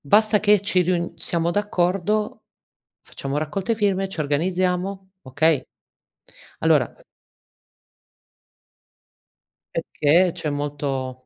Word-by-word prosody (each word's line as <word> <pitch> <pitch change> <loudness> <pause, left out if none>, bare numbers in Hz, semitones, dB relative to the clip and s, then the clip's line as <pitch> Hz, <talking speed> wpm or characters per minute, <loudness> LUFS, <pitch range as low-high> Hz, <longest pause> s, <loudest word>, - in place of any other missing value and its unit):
Basta 210 +8 +4
che 210 -2 +4
ci 195 -2 +2
riun 175 -1 -1
siamo 170 +1 -1
d'accordo, 205 +1 0 0.6
facciamo 135 +1 -5
raccolte 170 +9 -1
firme, 200 -3 0
ci 190 - -8
organizziamo. 180 +5 -1
Okay. 145 +2 +2 1.0
Allora - - +3 2.8
Perché 170 +5 +2
c'è 155 - -4
molto 140 -3 -3
175 Hz, 85 wpm, -23 LUFS, 150-195 Hz, 2.8 s, Basta